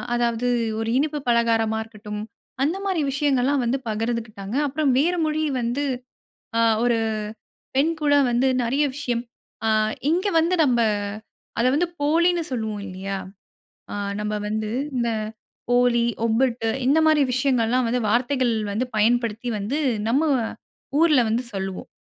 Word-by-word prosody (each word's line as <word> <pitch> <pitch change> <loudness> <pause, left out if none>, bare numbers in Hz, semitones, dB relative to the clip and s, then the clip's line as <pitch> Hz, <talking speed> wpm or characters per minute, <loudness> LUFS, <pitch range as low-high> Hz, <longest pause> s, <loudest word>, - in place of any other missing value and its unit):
அதாவது 235 0 0 0.3
ஒரு 225 0 -2
இனிப்பு 300 0 -1
பலகாரமா 225 -2 +2
இருக்கட்டும், 210 -1 -8 0.4
அந்த 330 +7 +1
மாரி 370 -5 0
விஷயங்கள்லாம் 275 -1 +1
வந்து 260 +3 0
பகிர்ந்துகிட்டாங்க. 220 -1 -3
அப்பறம் 275 -2 +1
வேற 345 +5 +2
மொழி 310 0 0 0.2
வந்து 245 +5 -1 0.7
ஆ - - +4 0.2
ஒரு 235 -2 +2 0.8
பெண் 305 +5 +3
கூட 290 -1 +3 0.2
வந்து 245 +3 +2 0.2
நெறைய 270 +6 +1
விஷயம் 245 -5 -2 0.4
அ - - +3 0.4
இங்க 365 +5 +1
வந்து 340 +3 +2
நம்ப 240 -3 +2 0.8
அத 240 - +2
வந்து 345 +4 +2
போலின்னு 340 +3 +3
சொல்லுவோம் 220 -4 -3
இல்லையா? 195 +1 -4 0.8
அ - - -3 0.3
நம்ம 210 0 -2 0.2
வந்து 215 0 -2 0.3
இந்த 235 -1 +1 0.7
ஓலி, 245 -1 +3 0.2
ஒப்பட்டு 230 0 +1 0.2
இந்த 290 +4 +4
மாரி 310 -2 +4
விஷயங்கள்லாம் 255 -2 +2
வந்து 245 +2 +1
வார்த்தைகள் 245 +2 +1 0.2
வந்து 230 +5 -1
பயன்படுத்தி 235 +1 +1
வந்து 215 +9 -2 0.3
நம்ம 270 +7 +2 0.8
ஊர்ல 305 -6 +5
வந்து 235 +3 0
சொல்லுவோம். 190 -1 -4
245 Hz, 130 wpm, -23 LUFS, 225-285 Hz, 0.8 s, ஊர்ல